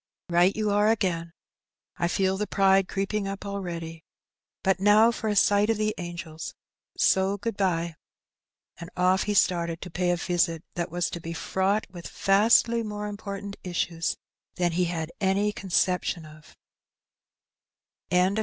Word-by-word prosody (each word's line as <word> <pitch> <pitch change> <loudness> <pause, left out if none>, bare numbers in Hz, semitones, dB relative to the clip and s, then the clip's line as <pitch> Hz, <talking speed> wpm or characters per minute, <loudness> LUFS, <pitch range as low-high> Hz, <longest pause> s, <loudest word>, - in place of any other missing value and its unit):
" - - -68
Right 175 +3 +4
you 215 -1 0
are 205 +1 +3
again. 175 -6 0 0.7
I 170 - +1
feel 190 +2 +1
the 210 +2 -2
pride 195 -1 +3
creeping 195 +1 -2
up 195 +1 -5
already. 170 -5 -5 0.6
But 190 -1 +2
now 210 +3 +6
for 225 -1 -4
a 210 - 0
sight 205 +1 +4
of 225 - +2
the 215 0 0
angels, 170 -2 -7 0.4
so 190 +1 +3
good 225 +2 -3
bye." 170 -4 0 0.9
And 170 - -8
off 185 +1 +3
he 205 - +1
started 170 -3 +2
to 180 - -9
pay 180 +2 0
a 175 - +3
visit 175 -2 0
that 170 -1 -3
was 175 +1 -1
to 170 - -5
be 165 0 -5
fraught 190 +5 0
with 175 -2 -8
vastly 225 +4 +3
more 210 -1 -5
important 200 -1 -6
issues 170 -2 -2 0.4
than 175 -1 +1
he 180 +2 +1
had 165 -1 -3
any 200 +2 +2
conception 180 -3 0
of. 155 0 -16
190 Hz, 155 wpm, -26 LUFS, 170-205 Hz, 0.9 s, now